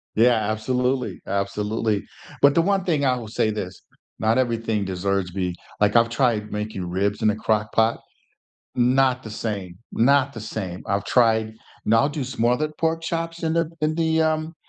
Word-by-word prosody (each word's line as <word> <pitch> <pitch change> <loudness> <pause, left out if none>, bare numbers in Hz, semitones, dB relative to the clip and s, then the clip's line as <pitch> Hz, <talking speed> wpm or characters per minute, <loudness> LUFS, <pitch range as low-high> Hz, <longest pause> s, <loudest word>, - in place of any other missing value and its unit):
Yeah, 110 -2 +3
absolutely, 125 -1 -1
absolutely. 105 +2 -1 0.4
But 140 0 +6
the 165 - +4
one 195 +1 +1
thing 155 -5 +1
I 130 -2 +3
will 115 -3 -7
say 110 0 0
this, 100 -3 -5 0.4
not 110 +3 +2
everything 115 -4 0
deserves 95 0 -1
to 90 - -12
be 90 -2 -1 0.3
like, 105 0 +3
I've 115 0 +5
tried 115 -4 0
making 105 -4 -4
ribs 100 +5 -1
in 110 - +4
a 105 - -2
Crock 105 -1 0
Pot. 115 +1 +2 0.8
Not 130 +1 +3
the 110 - -8
same. 100 -5 -4
Not 140 +3 +3
the 115 - -8
same. 95 -4 -5
I've 100 0 -1
tried, 110 -1 +2 0.3
and 115 - +3
I'll 135 +5 +4
do 145 -2 -3
smothered 130 +4 0
pork 165 0 0
chops 165 +1 -3
in 160 -1 0
the 165 -1 +1
in 155 +1 +1
the, 160 -1 +2
um 155 +1 0
115 Hz, 180 wpm, -23 LUFS, 105-140 Hz, 0.8 s, But